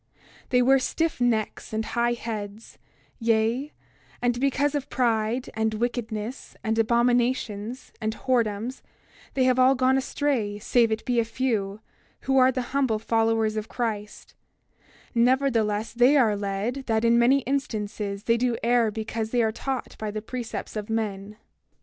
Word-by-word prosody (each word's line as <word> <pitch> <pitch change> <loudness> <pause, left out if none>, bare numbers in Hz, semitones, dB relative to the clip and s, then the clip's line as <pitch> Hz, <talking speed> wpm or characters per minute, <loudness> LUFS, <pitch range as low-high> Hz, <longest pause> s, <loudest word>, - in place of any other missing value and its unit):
28:14 - - -33
They 250 -1 +4
wear 270 +2 +5
stiff 320 +1 -1
necks 225 -3 0
and 220 0 -1
high 240 0 +1
heads; 220 -2 -6 0.4
yea, 230 +5 +1 0.5
and 245 0 0
because 275 +2 +1
of 290 -2 -3
pride, 235 0 0
and 220 0 0
wickedness, 235 0 -4
and 225 0 0
abominations, 235 0 0
and 220 0 -1
whoredoms, 235 -1 -1 0.5
they 265 - +3
have 255 0 +3
all 260 +1 +6
gone 260 +1 +3
astray 260 -7 -1
save 230 +2 +2
it 220 - -2
be 245 -1 +1
a - - +3
few, 220 -4 -2 0.4
who 270 0 +2
are 255 0 +6
the 255 -1 -2
humble 265 -6 +2
followers 225 0 +1
of 215 0 -4
Christ; 215 -4 -4 0.8
nevertheless, 230 -4 +2
they 245 +5 +5
are 225 -6 +4
led, 205 +7 -3
that 225 0 +1
in 235 0 +5
many 260 +4 +4
instances 210 -7 -3
they 230 0 +2
do 240 -1 0
err 235 -1 +3
because 220 +1 -4
they 240 0 +2
are 220 - +1
taught 260 +3 -4
by 215 - -3
the 210 0 -5
precepts 240 -1 -5
of 210 0 -4
men. 210 -2 -3
230 Hz, 155 wpm, -25 LUFS, 220-255 Hz, 0.8 s, all